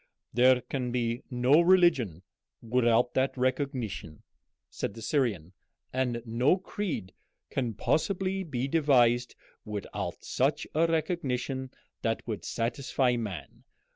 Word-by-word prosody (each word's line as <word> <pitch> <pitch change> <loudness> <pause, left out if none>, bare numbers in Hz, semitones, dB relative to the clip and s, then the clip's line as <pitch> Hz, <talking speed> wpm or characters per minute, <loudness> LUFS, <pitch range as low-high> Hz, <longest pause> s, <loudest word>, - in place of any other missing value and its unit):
"There 125 +1 +5
can 125 -2 -3
be 120 0 -1
no 130 +5 +4
religion 165 - +4 0.4
without 120 0 +2
that 130 0 +1
recognition," 130 - -2 0.4
said 100 - -4
the 115 - -9
Syrian, 105 - 0 0.4
"and 125 -3 -1
no 120 +9 +3
creed 185 - -4 0.4
can 120 -5 -1
possibly 190 - 0
be 135 -7 -2
devised 125 -6 +3 0.3
without 105 -1 -5
such - - 0
a 165 +2 +3
recognition 135 -5 -1 0.3
that 115 -1 -1
would 110 -3 -4
satisfy 125 +1 0
man. 105 -6 -6
125 Hz, 110 wpm, -29 LUFS, 115-145 Hz, 0.4 s, There